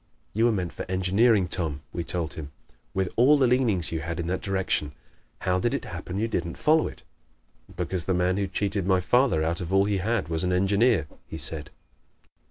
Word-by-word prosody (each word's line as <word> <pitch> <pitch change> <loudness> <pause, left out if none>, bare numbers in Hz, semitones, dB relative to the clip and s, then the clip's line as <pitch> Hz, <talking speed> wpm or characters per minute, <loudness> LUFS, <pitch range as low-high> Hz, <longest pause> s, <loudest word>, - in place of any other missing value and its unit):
"You 110 +3 +2
were 120 - +4
meant 90 -5 -2
for - - -5
engineering, 95 +2 +3
Tom," 80 -6 -1
we 85 - -2
told 85 -1 -2
him. 75 -2 -8 0.4
"With 95 -1 -1
all 135 +6 +6
the 135 - +4
leanings 120 -9 +2
you 80 - -2
had 85 +2 -4
in 85 - -2
that 90 +2 -2
direction, 95 -6 -1 0.5
how 90 0 +1
did 120 +5 0
it - - -4
happen 95 - -6
you 110 +3 0
didn't 85 -6 -3
follow 155 +1 +3
it?" - - -11 0.7
"Because 90 0 -2
the 95 - +1
man 90 +1 +1
who 100 -1 0
cheated 100 0 -2
my 95 -1 +4
father 120 -4 +2
out 85 +2 -1
of 90 0 -5
all 95 +1 +4
he 100 -1 0
had 110 +4 -1
was 80 0 -1
an 90 0 +1
engineer!" 100 0 +3 0.2
he - - -7
said. 75 -3 -1
95 Hz, 205 wpm, -26 LUFS, 85-105 Hz, 0.7 s, all